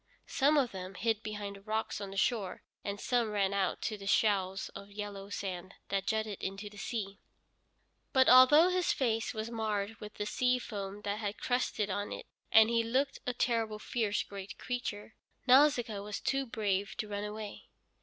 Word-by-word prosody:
Some 290 +3 +3
of 260 -5 +2
them 185 0 -7
hid 220 +1 0
behind 205 -2 -5
the - - -15
rocks 215 0 -2
on 200 - -5
the 195 - -8
shore, 200 -3 0 0.2
and 200 0 -4
some 240 -1 +1
ran 200 -2 +1
out 195 -2 0
to 215 -3 -2
the 195 - -8
shoals 195 -2 +2
of 200 0 -10
yellow 200 -1 -6
sand 185 -2 -5
that 195 -1 -1
jutted 220 -1 -1
into 195 +2 -4
the 205 - -13
sea. 200 -2 -4 0.9
But 260 -1 +5
although 295 +7 +8
his 365 -1 +2
face 225 -4 0
was 220 0 -4
marred 220 -1 -2
with 210 0 -9
the 210 - -3
sea 250 +3 +2
foam 205 -4 -6
that 205 +1 -2
had 205 -1 -3
crusted 235 -5 0
on 205 +2 -2
it, - - -6 0.3
and 220 +1 +7
he 230 -1 +3
looked 265 +4 0
a 250 - +1
terrible, 225 -3 0
fierce, 215 -1 -1
great 195 -1 -8
creature, 225 -4 -4 0.3
Nausicaa 255 -5 +5
was 205 0 -5
too 270 -1 0
brave 205 -2 -1
to 215 - -3
run 205 0 -3
away. 210 0 -6
210 Hz, 185 wpm, -32 LUFS, 200-235 Hz, 0.9 s, although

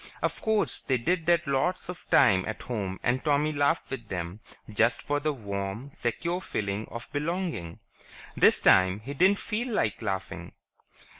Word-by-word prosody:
Of - - -1
course, 220 -1 0
they 130 - +1
did 165 +7 -1
that 170 -1 +3
lots 140 +6 0
of 180 0 -8
times 95 -1 +5
at 110 - -5
home 100 -6 -3
and 125 +1 +1
Tommy 150 0 +2
laughed 145 +1 +1
with 120 -6 -6
them 90 +2 -4 0.3
just 115 +2 +2
for 145 0 0
the 155 +1 0
warm, 100 +1 -5
secure 170 +10 -2
feeling 100 - -3
of 115 +1 -7
belonging. 155 - -3 0.6
This - - +5
time 95 +2 +4
he 135 +6 -6
didn't 185 +7 +4
feel 230 +5 -3
like 110 - 0
laughing. 95 -3 -4
130 Hz, 160 wpm, -28 LUFS, 100-165 Hz, 0.6 s, times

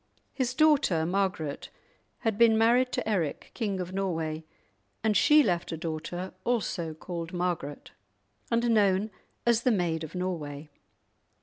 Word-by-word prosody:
His 255 -2 -1
daughter 275 - +3
Margaret 180 -5 -1 0.5
had 225 -3 0
been 225 0 +5
married 245 +3 +4
to - - -2
Eric, 175 -9 -1
King 205 -5 -2
of 180 0 -5
Norway, 165 -5 -2 0.6
and 220 -1 +2
she 300 +8 +6
left 175 -6 -1
a 165 - -3
daughter 165 +3 -5
also 185 -9 -1
called 170 +1 -6
Margaret, 175 -5 -3 0.6
and 235 0 +2
known 205 -1 +3 0.3
as 235 -1 +3
the 250 - +2
"Maid 175 -7 0
of 160 - -8
Norway." 155 -5 -4
185 Hz, 135 wpm, -28 LUFS, 165-225 Hz, 0.6 s, she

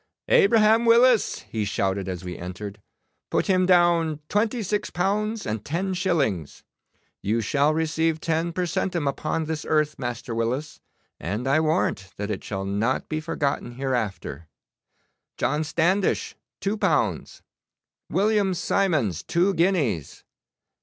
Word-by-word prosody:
'Abraham 230 - +5
Willis,' 235 0 +4
he 110 -2 -2
shouted 95 -1 -1
as 90 -1 -5
we 90 -1 -5
entered; 100 +4 -7 0.5
'put - - +1
him 185 -1 +2
down 170 -4 +3
twenty 220 +3 0
six 205 +1 -1
pounds 210 +4 -1
and 110 0 -3
ten 185 - -2
shillings. 140 - -1 0.6
You 110 +4 0
shall 140 +7 +2
receive 160 0 0
ten 165 +1 -1
per 180 +2 -1
centum 170 -2 -1
upon 155 +3 -1
this 155 -1 -3
earth, 150 -1 0
Master 120 -2 -4
Willis, 125 +7 -2 0.4
and 105 +9 -3
I 140 +4 +4
warrant 155 - 0
that 105 +1 -3
it 100 - -4
shall 95 -2 -4
not 105 +6 -1
be 155 - -1
forgotten 145 -6 -2
hereafter. 120 - -3 0.9
John 150 +2 0
Standish, 175 +5 +1 0.2
two 200 +2 -1
pounds. - - 0 0.7
William 200 -2 +2
Simons, 160 - +1
two 180 +3 +1
guineas. 160 - 0
155 Hz, 130 wpm, -25 LUFS, 110-185 Hz, 0.9 s, Abraham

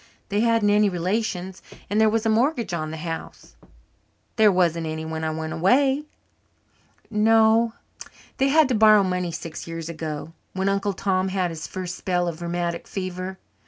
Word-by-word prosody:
They 205 0 0
hadn't 230 -2 +3
any 210 0 +4
relations 185 0 -2 0.3
and 210 +2 +1
there 220 - +5
was 225 +1 0
a - - +3
mortgage 235 - +1
on 155 -2 -2
the 160 - -6
house." 165 +1 -7 0.8
"There 215 -2 +5
wasn't 170 -3 +1
any 160 0 -4
when 160 0 -4
I 160 - 0
went 160 0 -4
away." 265 - +2 1.1
"No; 225 +1 +4 0.6
they 270 - +2
had 305 +1 +5
to - - +1
borrow 215 -2 +6
money 180 -2 -1
six 165 0 -7
years 165 0 -6
ago 155 -1 -5 0.2
when 190 +1 0
Uncle 200 0 0
Tom 190 -1 0
had 185 -2 -1
his 160 -1 -6
first 180 -1 -5
spell 180 -1 -1
of 170 0 -5
rheumatic 170 0 -3
fever. 185 0 -5
185 Hz, 165 wpm, -24 LUFS, 170-220 Hz, 1.1 s, borrow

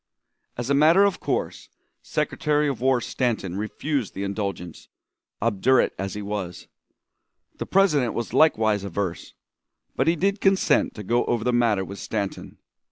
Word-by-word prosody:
As 120 +3 -3
a - - +4
matter 160 +7 +5
of 200 -2 +1
course, - - -3 0.3
Secretary 150 0 0
of 135 -5 -3
War 130 -1 +2
Stanton 115 -8 -2
refused 115 +4 -3
the 100 - -3
indulgence, 100 -4 -5 0.5
obdurate 115 +4 +2
as 95 +1 -4
he 105 - -5
was. 100 -4 -5 0.9
The - - -4
President 150 - +2
was 120 - -4
likewise 110 -9 +3
averse, 95 -2 -4 0.6
but - - 0
he 165 - +4
did 195 +4 0
consent 195 -1 +2
to 105 - -7
go 120 +5 +1
over 120 -2 -1
the 125 +1 +1
matter 115 -5 +2
with 100 +1 -9
Stanton. 100 -3 -4
115 Hz, 150 wpm, -24 LUFS, 100-145 Hz, 0.9 s, matter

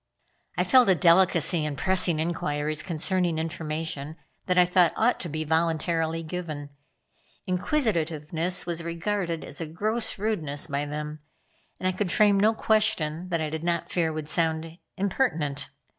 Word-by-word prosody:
I - - +3
felt 255 -5 +5
a 190 - +6
delicacy 170 -2 +4
in 150 -1 -2
pressing 180 0 +1
inquiries 155 -2 -1
concerning 175 0 0
information 160 -2 -3 0.3
that 180 -1 +1
I 180 - +7
thought 180 -1 +3
ought 240 +3 +2
to 175 - -4
be 155 +1 -3
voluntarily 165 +1 0
given. 155 -4 -6 0.7
Inquisitiveness 175 - 0
was 170 -1 -2
regarded 170 0 -2
as - - -7
a 165 - -3
gross 215 +8 -1
rudeness 165 -9 -2
by 145 -1 -2
them, 150 +1 -5 0.6
and 185 - -1
I - - +2
could 190 -2 -1
frame 205 -2 +4
no 220 +2 +4
question 180 -7 +1
that 170 -2 0
I 155 -1 -2
did 160 0 -4
not 170 -1 -1
fear 165 -3 +1
would 155 -1 -5
sound 160 +1 -1 0.2
impertinent. 165 - -1
165 Hz, 150 wpm, -26 LUFS, 155-185 Hz, 0.7 s, I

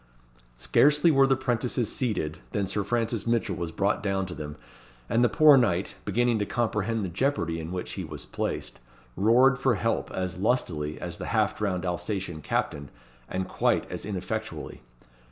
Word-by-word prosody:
Scarcely 150 - +4
were 135 -2 +5
the 135 - +4
'prentices 120 -2 -1
seated, 90 - -1
than 100 -2 0
Sir 100 +2 -1
Francis 115 0 -1
Mitchell 115 -4 +1
was 85 -1 -4
brought 100 +4 0
down 95 -1 0
to 90 - -6
them, 75 -2 -7 0.5
and 115 - +2
the 120 - +4
poor 155 -3 +7
knight, 100 -6 +1
beginning 120 +2 +2
to 105 - 0
comprehend 110 -2 -1
the - - -2
jeopardy 90 -3 -1
in 80 +1 -6
which 90 -1 -4
he 95 - -4
was 75 -3 -7
placed, - - -4 0.4
roared 125 +6 +4
for 130 -3 +2
help 115 +3 -1
as 90 -1 -3
lustily 80 -10 0
as - - -6
the - - -5
half - - +1
drowned 95 -4 -2
Alsatian 90 -2 -3
captain, 70 0 -2 0.4
and 95 0 -2
quite - - +1
as - - -5
ineffectually. 105 -3 -5
105 Hz, 170 wpm, -27 LUFS, 90-120 Hz, 0.5 s, poor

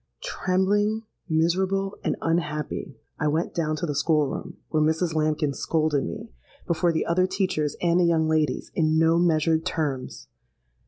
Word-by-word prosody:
"Trembling, 205 +4 +1 0.3
miserable, 190 +5 +1
and - - 0
unhappy, 150 -3 -2 0.2
I 150 - +1
went 155 +3 0
down 155 -2 0
to 155 - -3
the 150 - -2
school 150 +1 +2
room, 135 - -6
where 155 - +1
Mrs. 160 +2 +1
Lambkin 155 -2 0
scolded 155 -2 0
me, 85 - -6 0.3
before 170 +1 +1
the 160 - -1
other 185 +2 +2
teachers 185 -6 -1
and 170 0 +3
the 180 - +4
young 165 -2 +2
ladies, 155 -4 0
in 155 -1 +2
no 165 +1 +4
measured 160 -1 +2
terms. 150 -7 -3
160 Hz, 155 wpm, -25 LUFS, 155-175 Hz, 0.3 s, the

